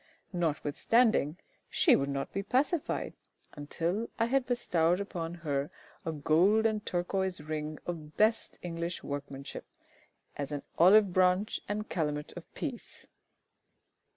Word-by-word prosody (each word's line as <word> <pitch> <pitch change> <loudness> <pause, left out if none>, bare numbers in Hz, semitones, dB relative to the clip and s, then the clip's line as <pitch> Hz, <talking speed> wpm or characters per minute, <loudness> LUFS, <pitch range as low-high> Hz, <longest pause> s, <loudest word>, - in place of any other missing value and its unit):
Notwithstanding, 170 - +2 0.3
she 345 -8 +5
would 140 0 0
not 140 0 -3
be 195 - -1
pacified 270 - 0 0.4
until 170 +9 -2
I 230 - +3
had 260 +2 +1
bestowed 180 -8 +2
upon 175 -4 -4
her 140 -1 0 0.4
a 165 - -1
gold 170 +9 +3
and 215 -2 +1
turquoise 185 +1 -1
ring 155 0 -4
of 155 -3 -6
best 220 +2 +2
English 170 0 -4
workmanship, 140 -1 -6 0.7
as 145 0 -4
an 145 -1 -3 0.2
olive 195 +2 +7
branch 185 +3 +3
and 210 +1 -2
calumet 150 -3 -2
of - - -10
peace. - - -6
175 Hz, 125 wpm, -31 LUFS, 150-210 Hz, 0.7 s, olive